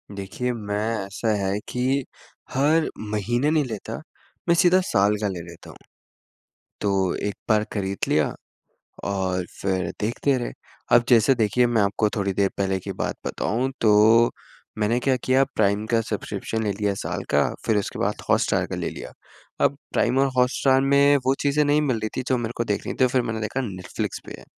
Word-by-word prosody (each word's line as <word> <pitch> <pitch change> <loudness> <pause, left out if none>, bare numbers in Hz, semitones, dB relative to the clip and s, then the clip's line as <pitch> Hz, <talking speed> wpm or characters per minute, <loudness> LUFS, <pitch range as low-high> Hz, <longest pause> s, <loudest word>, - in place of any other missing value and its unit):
देखिए, 105 +6 -3
मैं 105 +1 -2
ऐसा 105 +3 -1
है 95 +2 0
कि 130 +2 0 0.5
हर 155 +4 +3
महीने 110 +6 -1
नहीं 155 -2 +3
लेता, 110 -5 -6 0.5
मैं 170 - +6
सीधा 185 +1 +5
साल 100 - +2
का 105 - +1
ले 95 -3 -4
लेता 85 0 -13
हूँ, - - -12 1.0
तो 95 -3 +1
एक 100 - -3
बार 110 -1 +4
खरीद 100 -2 -2
लिया - - +2 0.8
और 95 -2 -1 0.2
फिर 95 -3 0
देखते 125 +5 +1
रहे। 120 - -3 0.4
अब 120 - +6
जैसे 125 +2 +5
देखिए 120 +2 +2
मैं 115 -3 +2
आपको 105 +1 +1
थोड़ी 100 -2 -1
देर 100 0 +2
पहले 95 -1 0
की - - -6
बात - - -2
बताऊँ 130 +5 -1
तो, 110 +2 +5 0.5
मैंने 110 +3 +1
क्या 130 +1 +2
किया 130 +1 +4
प्राइम 100 0 +2
का 115 - +4
सब्सक्रिप्शन 110 0 -3
ले 105 - 0
लिया 100 -1 +1
साल - - -4
का - - +4 0.2
फिर 110 -2 +2
उसके 100 - -3
बाद - - +1 0.2
हॉटस्टार - - +2
का - - -4
ले - - -2
लिया। - - -8 0.5
अब 140 - +1 0.2
प्राइम 125 +3 +2
और 135 - +4
हॉटस्टार 130 +1 +3
में 140 +1 +5
वो 135 - +4
चीज़ें 145 +1 +2
नहीं 145 +1 +3
मिल 130 -6 0
रही 110 0 -2
थी - - 0
जो 130 - +2
मेरे 120 0 -3
को 115 - +1
देखनी 105 -3 -2
थी 130 - +6
फिर 130 0 +1
मैंने 110 -2 -3
देखा 110 +5 -2
नेटफ्लिक्स 95 -5 -5
पे - - -8
है। - - -14
110 Hz, 185 wpm, -24 LUFS, 100-130 Hz, 1.0 s, मैं